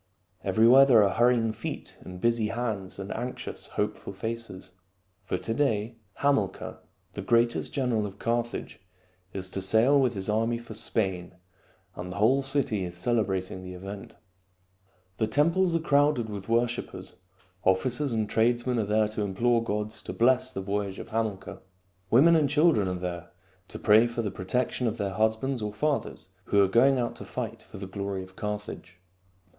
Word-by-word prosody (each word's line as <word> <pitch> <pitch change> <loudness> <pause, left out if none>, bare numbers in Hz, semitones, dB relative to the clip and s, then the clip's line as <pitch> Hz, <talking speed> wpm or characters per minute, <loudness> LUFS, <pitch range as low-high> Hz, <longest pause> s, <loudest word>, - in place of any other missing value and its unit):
Everywhere 120 +5 +6
there 120 -6 +6
are 100 -2 +2
hurrying 120 -1 +3
feet 110 - -7
and 90 -1 -9
busy 115 0 +1
hands 110 -5 -3
and 95 0 -6
anxious, 125 +2 -5
hopeful - - -3
faces. 110 -3 -6 0.5
For - - -3
to 115 - -3
day 115 -4 0 0.3
Hamilcar, 135 -10 0 0.3
the - - -5
greatest 120 0 +2
general 120 -6 0
of 100 0 -11
Carthage, 120 +1 -2 0.5
is 95 -1 -5
to 95 - -3
sail 110 +9 +4
with 125 -3 +1
his 95 -1 -4
army 115 +2 +1
for 120 -1 -10
Spain, 95 -5 -2 0.6
and 90 0 -6
the - - -7
whole 120 +7 +3
city 135 -7 0
is 90 -1 -6
celebrating 95 -4 -1
the 90 0 -8
event. 100 +2 -9 1.0
The 110 - +1
temples 165 +8 +2
are - - +2
crowded 145 -7 +2
with 100 0 -7
worshipers. 120 +1 -1 0.5
Officers 125 +9 +1
and 110 -2 0
tradesmen 120 +2 +1
are 110 - 0
there 105 +1 +2
to 105 0 -3
implore 115 +4 +1
the 115 - -7
gods 105 +1 -3
to - - -6
bless 130 +2 +3
the 95 - -5
voyage 100 0 -3
of - - -8
Hamilcar. 110 -4 -3 0.5
Women 155 +10 +6
and 150 -3 +3
children 150 - +3
are 90 - -2
there 90 -1 -5 0.4
to - - -8
pray 110 +2 +5
for 115 0 -3
the 105 - -2
protection 125 +6 -1
of 115 +1 -2
their 100 -3 -2
husbands 110 +5 0
or 105 0 -2
fathers 140 -3 -2 0.2
who 100 - +2
are - - +3
going 130 +7 +4
out 120 -1 -2
to - - -8
fight 115 -2 -5
for 110 - -12
the 95 - -6
glory 100 0 -4
of 95 0 -15
Carthage. 105 -3 -6
110 Hz, 170 wpm, -27 LUFS, 100-120 Hz, 1.0 s, Everywhere